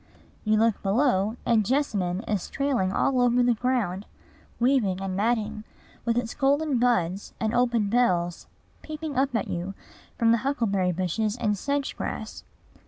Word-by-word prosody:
You 215 0 +2
look 225 -1 +2
below, 215 0 +1
and 225 -3 +3
jessamine 205 -7 0
is 205 -4 -2
trailing 265 -10 0
all 255 +5 +1
over 245 0 +3
the 245 0 +4
ground, 220 -5 -1 0.5
weaving 235 -7 +2
and 190 -1 -3
matting, 215 0 0 0.4
with 235 0 +1
its 240 -1 -1
golden 285 -1 +1
buds 200 -6 0
and 220 0 -1
open 240 -3 +2
bells 180 -7 +1 0.3
peeping 310 -1 -6
up 265 -1 +1
at - - 0
you 180 +3 -4 0.4
from 230 -1 +4
the 230 - +3
huckleberry 215 -8 0
bushes 195 +5 -1
and 215 -4 0
sedge 280 +6 -2
grass. - - -5
230 Hz, 150 wpm, -26 LUFS, 195-250 Hz, 0.5 s, the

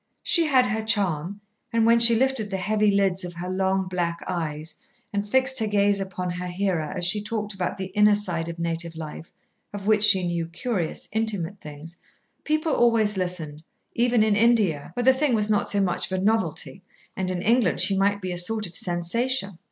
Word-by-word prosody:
She 335 -2 +4
had 260 -4 +4
her 220 -2 -2
charm, 200 -4 -1 0.3
and 230 -1 +2
when 230 +1 +4
she 230 0 +7
lifted 255 -3 0
the 195 - -3
heavy 210 +2 +1
lids 195 -2 +1
of 175 -1 -7
her 180 +2 -5
long 190 0 0
black 175 -2 -2
eyes 160 -3 -3 0.4
and 200 0 -1
fixed 260 +2 +3
her 220 - -1
gaze 205 -1 +2
upon 185 -2 -4
her 180 +1 -5
hearer 180 -4 -2
as 175 - 0
she 205 +4 +4
talked 210 0 -4
about 190 0 -4
the 190 - -4
inner 210 0 +4
side 175 -5 -2
of 170 - -7
native 170 0 -3
life, 160 0 -9 0.4
of 205 -1 -8
which 215 -1 +2
she 190 -3 +6
knew 170 -1 -2
such 165 - -17
curious, 200 -10 -3
intimate 205 -4 -3
things, 150 +3 -11 0.5
people 310 0 -1
always 225 -3 +2
listened, 175 -5 -4 0.3
even 240 -2 +2
in 215 -1 +2
India, 210 -10 +2
where 245 - -2
the 260 +1 +5
thing 260 -2 0
was 215 0 0
not 210 - +1
so 205 - +1
much 185 -3 0
of 185 - -1
a - - -3
novelty, 195 -3 -1 0.3
and 185 -1 -3
in 180 -1 -3
England 230 -5 +2
she 195 +2 +3
might 200 +1 +1
be 185 - -3
a 175 - 0
sort 215 +4 +1
of 175 - -9
sensation. 195 +3 -1
200 Hz, 205 wpm, -24 LUFS, 175-220 Hz, 0.5 s, she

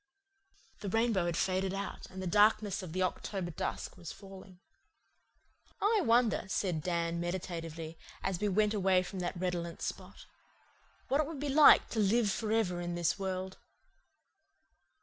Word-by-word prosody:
The 200 - -4
rainbow 225 -4 +1
had 170 0 -1
faded 190 0 0
out, 200 +1 -5
and 190 0 -8
the - - -4
darkness 205 +1 +3
of 180 -4 -7
the 185 +2 0
October 185 0 -3
dusk 165 - -4
was 170 -3 -7
falling. 190 -2 -12 1.2
"I 420 +1 +3
wonder," 235 -4 +3
said 180 -4 -1
Dan 170 0 -1
meditatively, 165 -2 -5 0.2
as 190 -3 -1
we 210 - +1
went 210 +2 +2
away 190 -3 +3
from 190 +1 -7
that 175 0 -3
redolent 175 -2 -3
spot, - - -6 0.8
"what 275 +3 +2
it 300 - -2
would 315 -3 -6
be 290 +1 -2
like 295 +2 +7
to 225 - -2
live 215 +1 +3
for 215 +2 -2
ever 185 -6 +1
in 175 0 -3
this 175 +3 0
world." 190 -1 -4
190 Hz, 155 wpm, -32 LUFS, 175-215 Hz, 1.2 s, like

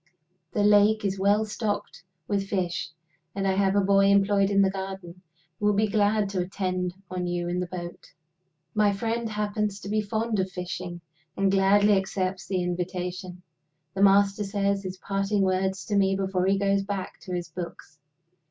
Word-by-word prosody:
The 205 - +1
lake 210 +1 +4
is 195 -1 -1
well 205 +3 +3
stocked 210 -4 -3 0.3
with 200 -1 -1
fish; 180 -3 -2 0.5
and 195 -1 -1
I - - +3
have 195 0 +2
a 200 - +4
boy 195 0 +4
employed 200 0 +4
in 200 -1 +4
the 190 - +2
garden, 190 -2 -7 0.4
who 210 - +1
will 210 - +3
be 215 +2 +3
glad 210 0 +2
to 195 -2 -2
attend 180 -1 -2 0.2
on 180 -1 -2
you 175 0 -2
in 175 +1 -1
the 180 - -2
boat." 175 -1 -7 0.7
My 210 -1 +3
friend 230 +3 -2
happens 210 -1 -2
to 200 - -7
be 215 +1 +1
fond 220 +1 -1
of 190 0 0
fishing, 180 -1 -6 0.4
and 195 0 +2
gladly 200 +2 +4
accepts 190 -2 -1
the 185 -2 -1
invitation. 180 +1 -4 0.5
The 195 - -2
Master 200 +1 +4
says 200 0 0
his 185 -1 -6
parting 195 +1 0
words 190 -1 0
to 205 - -2
me 195 -1 +3
before 190 -1 0
he 195 +1 +3
goes 195 0 +2
back 195 -1 -5
to 185 - -7
his 175 -1 -4
books. 170 -2 -8
195 Hz, 180 wpm, -26 LUFS, 185-205 Hz, 0.7 s, lake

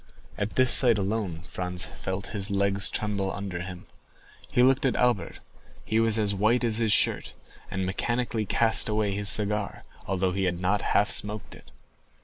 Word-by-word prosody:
At 100 +2 -3
this 130 -1 +4
sight 120 -4 +5
alone 95 -4 -2
Franz 90 0 0
felt 95 +3 -6
his 100 -1 -2
legs 100 -1 +1
tremble 100 -3 -2
under 95 -3 -5
him. 90 -1 -8 0.7
He 125 - +3
looked 135 +1 +4
at 130 - +1
Albert—he 115 -1 -2
was 115 -1 +3
as 105 -2 +1
white 110 +5 +2
as 115 -1 0
his 110 -2 +1
shirt, - - +1 0.4
and 95 0 -2
mechanically 115 +3 -2
cast 115 +1 +2
away 105 -1 0
his 100 +1 0
cigar, 105 -1 +1 0.2
although 95 -1 0
he 95 +1 -1
had 90 -1 -1
not 95 +3 +1
half 105 - +2
smoked 105 0 -3
it. - - -15
105 Hz, 165 wpm, -27 LUFS, 95-110 Hz, 0.7 s, sight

